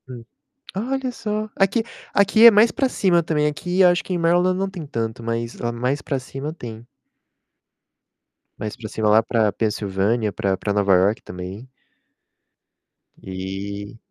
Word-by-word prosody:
Hum. 125 -2 -9 0.5
Olha 255 +4 -2
só! 215 -2 -3
Aqui 195 +4 +2 0.3
aqui 205 +3 +4
é - - +12
mais 220 +2 +5
pra 270 - +1
cima 180 -8 +2
também, 155 -2 0
aqui 175 +5 0
acho 175 0 +4
que - - -6
em 180 - 0
Maryland 175 +2 +2
não 195 0 -1
tem 180 -4 -7
tanto, 115 -2 -4
mas 115 +1 -3
lá 120 - -2
mais 125 +4 -2
pra 140 - -2
cima 135 +4 -6
tem. 120 -7 -9 1.7
Mais 105 0 -5
pra 110 -2 -8
cima, 110 0 0
lá 110 +2 +5
pra 110 -2 +1
Pensilvânia, 105 +1 -1
pra 95 -1 -1
pra 100 - -2
Nova 100 -1 +3
York 95 +4 +2
também. 90 +7 -8 1.5
E 100 +3 -6
120 Hz, 155 wpm, -22 LUFS, -, 1.7 s, é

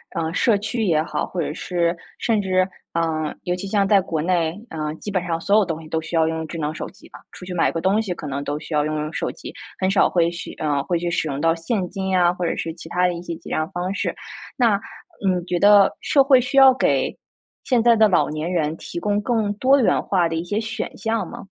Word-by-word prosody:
呃， 165 0 -2
社 215 0 +3
区 225 +2 -2
也 155 -4 +2
好， - - -2
或 180 - -4
者 150 - -3
是 170 0 -1 0.2
甚 220 -3 +1
至， 185 -1 +2 0.3
啊， 160 -2 -1
尤 180 - -1
其 185 +2 -5
像 200 0 +2
在 200 0 +5
国 165 -4 -2
内 170 0 0
啊， 155 -1 -4
基 205 +5 -7
本 185 -3 0
上 165 -2 -1
所 200 +4 +3
有 215 - +4
东 165 -2 -4
西 155 - -12
都 160 0 -1
需 160 - -6
要 160 -1 +4
用 160 0 -2
智 170 - -7
能 150 0 -2
手 - - -5
机 - - -18
吧。 - - -13
出 - - -11
去 180 - -6
买 175 - +2
个 165 - -3
东 195 +3 +2
西 200 -5 -3
可 155 - -8
能 140 0 -3
都 145 +1 -2
需 155 - -8
要 150 0 +2
用 155 0 -2
用 150 +1 -3
手 - - -2
机， - - -9 0.2
很 190 0 +1
少 195 - +4
会 170 -1 +2
去 170 - -7
呃， 145 -2 -1
会 175 +2 0
去 170 0 -2
使 160 - 0
用 140 -2 -3
到 165 +1 +3
现 180 +3 -2
金 190 -2 -4
呀， 180 -2 +3
或 180 -1 -3
者 - - 0
是 165 -1 -4
其 170 - -11
他 180 +1 +1
的 180 - -1
一 170 - -6
些 170 -2 -5
结 - - -12
账 155 +1 -1
方 180 +2 -3
式。 - - -2 0.4
那 225 -6 +3 0.5
你 180 -2 +1
觉 175 -1 -1
得 205 0 +6
社 275 -2 +3
会 270 -2 +6
需 275 +3 -2
要 265 -1 +9
给 260 - +1 0.5
现 245 -4 +2
在 235 -1 +6
的 220 -1 +5
老 185 - +2
年 155 +3 -3
人 160 -3 0
提 170 - -6
供 205 0 0
更 220 -3 0
多 265 +5 +4
元 - - +3
化 175 -4 +1
的 165 - -3
一 165 +2 -3
些 210 +5 -1
选 225 0 -5
项 225 -2 -1
吗？ - - -9
180 Hz, 280 characters per minute, -22 LUFS, 165-205 Hz, 0.5 s, 要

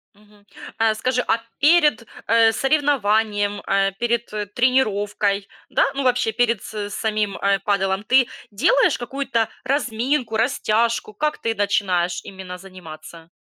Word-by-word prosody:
Мгм. 210 0 -23 0.3
А 225 -1 +2
скажи, 250 +2 0
а - - +3 0.2
перед, 300 -6 +4 0.2
э, 225 0 +5
соревнованием, 215 -8 +1
э, 195 0 +2
перед, 235 -1 -1
э, 210 -1 -2
тренировкой, 205 -4 0 0.2
да, - - +2
ну, 275 - -1
вообще, 250 -3 +1
перед 230 -2 0
с 210 -1 -5
самим, 210 -1 -2
э, 200 0 +1
падэлом 195 0 0
ты 255 0 +4 0.2
делаешь 425 - +3
какую-то 240 -3 -2 0.2
разминку, 250 -2 -1
растяжку? 225 -2 0
Как 300 +8 -2
ты 230 - -1
начинаешь 185 -4 0
именно 190 -1 -8
заниматься? 170 -3 -12
220 Hz, 130 wpm, -21 LUFS, 200-250 Hz, 0.3 s, э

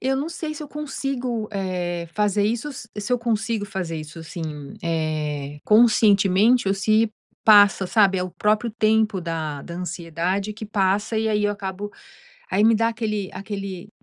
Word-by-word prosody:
eu 265 +1 0
não 285 +4 -2
sei 315 -2 -5
se 305 - -7
eu 290 - -8
consigo, 265 -6 -3
eh, 180 -3 -3
fazer 210 -1 +2
isso 235 +7 -1
se 225 -2 -6
eu 245 - +3
consigo 225 -2 -1
fazer 185 -5 -4
isso, 155 +1 -8
assim, 165 +1 -7 0.4
eh, 150 -3 -2
conscientemente 210 0 +4
ou 195 - +2
se 215 +3 +2 0.3
passa, 205 -3 +6
sabe, 195 -2 +3
é - - 0
o 185 - -4
próprio 215 +5 +1
tempo 220 -2 +2
da 160 -4 -4
da 170 - -8
ansiedade 180 +3 -2
que 215 +1 -8
passa 205 +1 0
e 220 - 0
aí 210 -1 +1
eu 205 - +2
acabo 200 0 -5 0.6
aí 205 - +3
me 225 0 +5
dá 230 +1 +2
aquele 215 -4 -3
aquele, 195 -1 -6
205 Hz, 165 wpm, -23 LUFS, 180-225 Hz, 0.6 s, passa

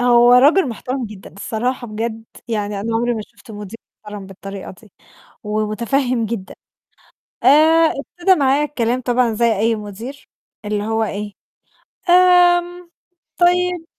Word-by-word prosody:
هو 240 0 +5
رجل 290 +7 +5
محترم 250 +2 -4
جدًا 205 -2 -12
الصراحة 240 +4 -3
بجد 225 +1 -5 0.2
يعني 210 -3 -2
أنا 225 +2 -3
عمري 240 +1 0
ما 220 - -4
شُفت 260 - -18
مدير 210 +1 -9 0.3
محترم 210 -2 -8
بالطريقة 195 0 -9
دي 210 -4 -20 0.5
ومتفهِّم 230 +4 -1
جدًا. 215 -4 -6 0.9
آآ، 315 +4 +5
ابتدا 355 +6 +1
معايا 280 -1 +2
الكلام 250 -4 -1
طبعًا 245 -1 +1
زي 225 -1 +1
أي 225 +1 +2
مدير 220 +6 -9 0.4
اللي 210 0 -2
هو 225 +1 0
إيه، 205 -1 -5 0.8
"آمم 355 -1 +4 0.5
طيب 360 -1 +2
235 Hz, 130 wpm, -19 LUFS, 215-285 Hz, 0.9 s, هو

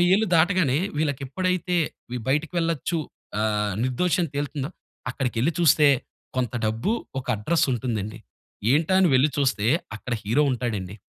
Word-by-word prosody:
60 - - +5
ఏళ్ళు 220 +2 +2
దాటగానే 165 -5 +3 0.2
వీళ్ళకప్పుడైతే 175 +5 -1 0.5
బయటికి 150 +4 +1
వెళ్లొచ్చు 165 0 -1 0.4
ఆహ్, 105 -2 0
నిర్దోషని 165 +5 +1
తేలుతుందో 145 -1 -2 0.4
అక్కడికెళ్లి 130 +3 0
చూస్తే 155 -3 +5 0.5
కొంత 125 -1 -1
డబ్బు, 110 - -1 0.3
ఒక 130 - -6
అడ్రెస్ 150 +10 +1
ఉంటుందండి. 110 -3 -3 0.5
ఏంటా 160 +5 +2
అని 180 - +5
వెళ్లి 130 +3 +5
చూస్తే 130 -7 +1 0.3
అక్కడ 125 - -6
హీరో 115 +9 +2
ఉంటాడండి. 105 -6 -3
140 Hz, 125 wpm, -25 LUFS, 120-165 Hz, 0.5 s, 60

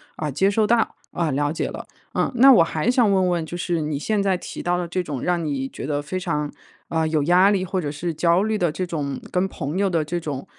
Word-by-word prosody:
呃， 150 -2 -3
接 190 +8 +2
收 215 +1 +2
到， 230 +1 +2 0.2
呃， 170 -2 -1
了 145 +2 0
解 160 - -2
了。 - - -7 0.3
嗯， - - 0
那 265 +3 +8
我 180 - +6
还 160 +4 -1
想 245 -4 +4
问 185 -2 +3
问， 170 -2 -1
就 175 +2 -6
是 175 -2 -1
你 150 -2 -2
现 210 +4 0
在 190 -2 +2
提 - - -7
到 175 0 +1
的 175 -1 -3
这 180 +2 -2
种 145 -7 -5
让 175 -2 0
你 135 -3 -2
觉 - - -7
得 145 0 -1
非 150 +6 -4
常， 150 -5 -2 0.4
呃， 160 -1 0
有 155 -1 +1
压 180 +5 +5
力 190 -2 0
或 185 0 -2
者 145 - -3
是 165 +3 -3
焦 170 +4 +2
虑 220 0 0
的 175 -5 +1
这 185 +4 -3
种 145 -5 -3
跟 180 0 +1
朋 150 +2 -4
友 200 0 +2
的 165 -4 0
这 175 +3 -3
种， 145 -5 -5
170 Hz, 280 characters per minute, -23 LUFS, 150-185 Hz, 0.4 s, 那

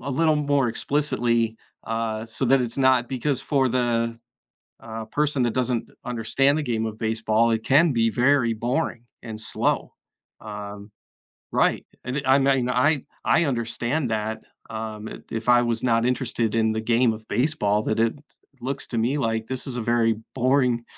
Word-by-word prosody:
a 140 - -4
little 155 +3 +2
more 145 -4 +1
explicitly, 115 -4 0 0.3
uh, 115 -1 -2
so 115 +4 -1
that 135 +1 +4
it's 120 0 -2
not, 130 -2 +3
because 135 +1 -1
for 135 -3 +1
the, 115 -2 0 0.6
uh, 110 0 -7
person 145 +1 0
that 120 -2 +1
doesn't 125 -2 -1 0.2
understand 125 +5 +1
the 155 - -1
game 115 -4 -1
of 110 0 -6
baseball, 110 +1 +1
it 110 -1 0
can 145 +3 +4
be 115 -1 +2
very 125 +1 +3
boring 120 +1 -2 0.2
and 110 -2 -7
slow. 110 - 0 0.5
Um, 105 -1 -8 0.6
right, - - +1 0.2
and 130 +3 -2
I 130 +1 +5
mean, 135 -2 +2
I 130 +3 +2 0.2
I 170 - +3
understand 120 +2 -1
that, 110 0 -2 0.3
um, 110 -1 -5
i - - -7
if 110 0 -4
I 120 0 +6
was 120 -1 -1
not 115 -2 +2
interested 120 -3 0
in 110 -1 +2
the 110 - -2
game 115 0 +2
of 110 0 -10
baseball, 105 -4 +1
that 110 +1 -1
it 115 0 +2 0.5
looks 135 +2 -3
to 120 - -4
me, 125 +6 +1
like, 115 -4 -1
this 130 +2 -2
is 125 -2 -4
a - - -2
very 115 0 +2 0.2
boring 125 -2 +2
120 Hz, 170 wpm, -24 LUFS, 110-130 Hz, 0.6 s, I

